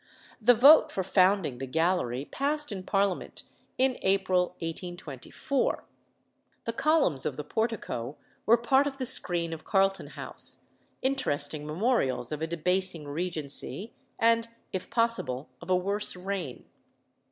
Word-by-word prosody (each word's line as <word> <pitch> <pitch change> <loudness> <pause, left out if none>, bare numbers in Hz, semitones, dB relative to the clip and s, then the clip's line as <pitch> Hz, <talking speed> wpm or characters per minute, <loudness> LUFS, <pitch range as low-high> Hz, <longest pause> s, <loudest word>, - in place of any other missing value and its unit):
The 245 +3 +6
vote 280 +7 +7
for 190 - -2
founding 185 -8 +2
the 135 - -4
Gallery 155 -4 0
passed 295 - -1
in 195 -2 -4
Parliament 195 0 -1 0.3
in 260 0 +2
April 185 -2 +1
1824. 175 - -3 0.8
The 230 - -2
columns 265 - +2
of 130 - -1
the 150 - -4
portico 155 - -3 0.3
were 230 +2 +7
part 265 +4 +3
of 270 -1 -5
the 260 - -3
screen 175 -9 +1
of 160 - -8
Carlton 195 -1 +1
House - - -3 0.4
interesting 150 - 0
memorials 155 - 0
of 150 0 -4
a 160 - -1
debasing 170 -1 0
regency, 165 +5 -3 0.2
and, 230 0 +3 0.3
if 185 - -4
possible, 230 - 0
of - - -11
a 185 - +4
worse 200 +3 0
reign. 180 -7 -5
185 Hz, 130 wpm, -28 LUFS, 155-230 Hz, 0.8 s, vote